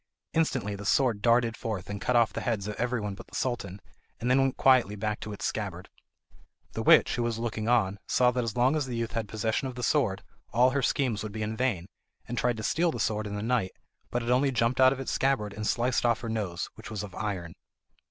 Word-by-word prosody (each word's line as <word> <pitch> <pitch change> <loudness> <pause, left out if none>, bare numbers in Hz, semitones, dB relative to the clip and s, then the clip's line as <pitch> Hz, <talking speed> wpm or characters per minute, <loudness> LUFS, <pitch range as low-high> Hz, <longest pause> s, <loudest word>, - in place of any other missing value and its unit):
Instantly 130 -10 0
the 100 +1 -7
sword 115 0 +2
darted 115 0 +3
forth 105 -6 -4
and 100 0 -5
cut 125 - 0
off 115 -6 +4
the - - -3
heads 105 -4 -1
of 105 - -3
everyone 120 -4 -1
but 95 - -11
the - - -12
Sultan, 105 -7 -2 0.4
and 120 +2 0
then 135 +1 +5
went 135 -1 0
quietly 125 -6 +4
back 105 +1 -2
to 110 - -6
its 105 - -5
scabbard. 95 -4 -4 0.8
The - - -4
witch, - - +6
who - - 0
was 120 -1 -1
looking 115 -1 -2
on, 100 -5 +2
saw 125 -1 +4
that 125 0 -1
as 115 0 -4
long 130 +5 +3
as 150 -4 -1
the 125 - -4
youth 115 0 -2
had 115 -2 -3
possession 110 +5 -1
of 130 - -7
the 125 - -5
sword, - - +1 0.3
all 125 +2 +5
her 140 +1 0
schemes 125 -5 0
would 110 - -5
be 110 +1 -4
in 110 +1 -3
vain, 110 -8 0 0.4
and 120 - -4
tried 125 -2 +1
to 110 - -5
steal 170 +9 +2
the - - -6
sword 110 0 -1
in 100 - -5
the 105 - -3
night, 115 -5 0 0.4
but 120 0 -2
it 120 - -1
only 130 +3 +3
jumped 120 +1 +1
out 130 0 +7
of 135 - -3
its 135 - -3
scabbard 130 -7 0
and 105 0 -4
sliced 120 +1 +1
off 120 0 +2
her 115 - -4
nose, 100 -6 -2
which 110 - -11
was 105 -2 -4
of 100 -3 -8
iron. 90 -5 -4
115 Hz, 245 wpm, -28 LUFS, 105-125 Hz, 0.8 s, out